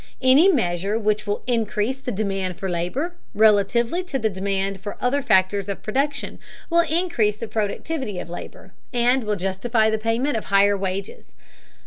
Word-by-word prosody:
Any 265 Hz, +7 st, +6 dB
measure 195 Hz, -, 0 dB
which 215 Hz, -1 st, 0 dB
will 205 Hz, -, -2 dB
increase 230 Hz, +1 st, -1 dB
the 255 Hz, -, -4 dB
demand 195 Hz, -3 st, -2 dB
for 190 Hz, 0 st, -4 dB
labor, 180 Hz, -, -2 dB, 0.2 s
relatively 220 Hz, -, +3 dB
to 290 Hz, -7 st, -2 dB
the 220 Hz, -4 st, 0 dB
demand 195 Hz, 0 st, -2 dB
for 205 Hz, 0 st, -6 dB
the -, -, -3 dB
other 280 Hz, +3 st, +2 dB
factors 200 Hz, -3 st, +2 dB
of 200 Hz, -, -5 dB
production, 280 Hz, +5 st, -2 dB, 0.3 s
will 340 Hz, -, +4 dB
increase 320 Hz, -, +1 dB
the 230 Hz, -, -5 dB
productivity 215 Hz, -, -3 dB
of -, -, -5 dB
labor, 175 Hz, -, -9 dB, 0.2 s
and 245 Hz, +1 st, +2 dB
will 210 Hz, -1 st, -1 dB
justify 215 Hz, +4 st, 0 dB
the 220 Hz, -, 0 dB
payment 230 Hz, +4 st, 0 dB
of 220 Hz, -, -5 dB
higher 200 Hz, +1 st, +4 dB
wages. 195 Hz, 0 st, -5 dB
215 Hz, 165 wpm, -23 LUFS, 195-255 Hz, 0.3 s, Any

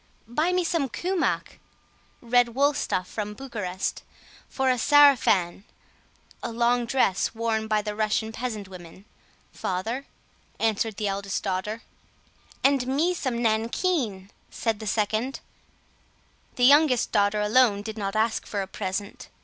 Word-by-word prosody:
"Buy 305 Hz, +9 st, 0 dB
me 360 Hz, 0 st, +1 dB
some 330 Hz, -5 st, 0 dB
kumach 360 Hz, +6 st, -2 dB, 0.6 s
(Red 240 Hz, 0 st, +2 dB
wool 285 Hz, +2 st, +3 dB
stuff 185 Hz, -9 st, -2 dB
from 210 Hz, 0 st, -5 dB
Bucharest) 210 Hz, -8 st, -4 dB, 0.5 s
for 265 Hz, -1 st, +1 dB
a 250 Hz, -, 0 dB
sarafan 245 Hz, -, +4 dB, 0.8 s
(A 235 Hz, -, -4 dB
long 240 Hz, +1 st, +1 dB
dress 225 Hz, -5 st, +1 dB
worn 225 Hz, -1 st, -1 dB
by 215 Hz, -1 st, +1 dB
the 210 Hz, 0 st, -3 dB
Russian 220 Hz, +1 st, 0 dB
peasant 220 Hz, -3 st, -5 dB
women) 185 Hz, +1 st, -12 dB, 0.5 s
father," 225 Hz, +9 st, -3 dB, 0.5 s
answered 220 Hz, -1 st, 0 dB
the 210 Hz, -1 st, -1 dB
eldest 200 Hz, 0 st, -3 dB
daughter. 205 Hz, +4 st, -3 dB, 0.8 s
"And 275 Hz, -2 st, +3 dB
me 305 Hz, +7 st, +1 dB
some 255 Hz, -8 st, -2 dB
nankeen," 225 Hz, -, 0 dB, 0.2 s
said 225 Hz, -3 st, -2 dB
the 220 Hz, -, -6 dB
second. 220 Hz, +5 st, -1 dB, 1.2 s
The 245 Hz, -, +3 dB
youngest 280 Hz, -2 st, +5 dB
daughter 205 Hz, 0 st, +2 dB
alone 210 Hz, -1 st, +3 dB
did 220 Hz, 0 st, -6 dB
not 195 Hz, 0 st, -3 dB
ask 220 Hz, +1 st, 0 dB
for 200 Hz, -2 st, -2 dB
a -, -, -8 dB
present. 195 Hz, +1 st, -5 dB
225 Hz, 135 wpm, -25 LUFS, 205-255 Hz, 1.2 s, youngest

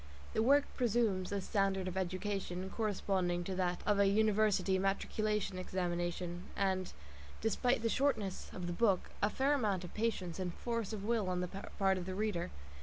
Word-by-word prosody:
The -, -, +2 dB
work 280 Hz, +5 st, +5 dB
presumes 220 Hz, -6 st, +1 dB
a 200 Hz, -1 st, 0 dB
standard 195 Hz, -2 st, +1 dB
of 185 Hz, -, -3 dB
education 190 Hz, 0 st, -2 dB
corresponding 190 Hz, -5 st, 0 dB
to 190 Hz, -, -3 dB
that 180 Hz, -1 st, 0 dB
of 205 Hz, -1 st, +3 dB
a 200 Hz, -, +6 dB
university 205 Hz, -2 st, +3 dB
matriculation 200 Hz, 0 st, 0 dB
examination, 175 Hz, -1 st, -2 dB
and, 190 Hz, -2 st, 0 dB, 0.5 s
despite 230 Hz, +2 st, +1 dB
the -, -, +3 dB
shortness 220 Hz, -8 st, 0 dB
of 180 Hz, -, -5 dB
the 175 Hz, -, -2 dB
book, 195 Hz, -1 st, +2 dB
a 205 Hz, -, +3 dB
fair 270 Hz, +6 st, +2 dB
amount 205 Hz, -9 st, +1 dB
of 180 Hz, -, -8 dB
patience 195 Hz, -6 st, -1 dB
and 180 Hz, -2 st, -3 dB
force 230 Hz, -3 st, -2 dB
of 210 Hz, -3 st, -4 dB
will 220 Hz, -4 st, +1 dB
on 180 Hz, -1 st, 0 dB
the 180 Hz, -, -1 dB
part 195 Hz, 0 st, -1 dB
of 180 Hz, -, -6 dB
the 185 Hz, -, -3 dB
reader. 205 Hz, -4 st, -1 dB
195 Hz, 175 wpm, -35 LUFS, 185-215 Hz, 0.5 s, a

